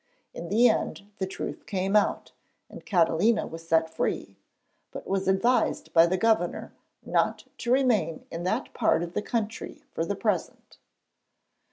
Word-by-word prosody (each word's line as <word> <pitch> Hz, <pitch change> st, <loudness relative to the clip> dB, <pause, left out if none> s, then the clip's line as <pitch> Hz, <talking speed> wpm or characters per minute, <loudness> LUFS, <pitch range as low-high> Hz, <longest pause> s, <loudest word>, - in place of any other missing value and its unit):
In 170 Hz, -, -7 dB
the 230 Hz, +5 st, +5 dB
end 205 Hz, -2 st, -1 dB
the 190 Hz, -, -1 dB
truth 190 Hz, -, -6 dB
came 195 Hz, 0 st, -1 dB
out, 210 Hz, -, +1 dB, 0.4 s
and -, -, -11 dB
Catalina 185 Hz, +5 st, +3 dB
was 165 Hz, 0 st, -9 dB
set 160 Hz, 0 st, +3 dB
free, 160 Hz, -, -3 dB, 0.5 s
but -, -, -8 dB
was 195 Hz, -1 st, -1 dB
advised 230 Hz, +7 st, +1 dB
by 165 Hz, +1 st, +7 dB
the 185 Hz, +2 st, 0 dB
Governor 215 Hz, -4 st, 0 dB, 0.3 s
not -, -, 0 dB
to 240 Hz, -, -2 dB
remain 235 Hz, -, +2 dB
in 165 Hz, -, -5 dB
that 180 Hz, -, -2 dB
part 165 Hz, -, +2 dB
of 175 Hz, 0 st, -6 dB
the -, -, -1 dB
country 225 Hz, 0 st, -4 dB
for -, -, -2 dB
the -, -, -2 dB
present. -, -, -3 dB
190 Hz, 155 wpm, -27 LUFS, 170-220 Hz, 0.5 s, by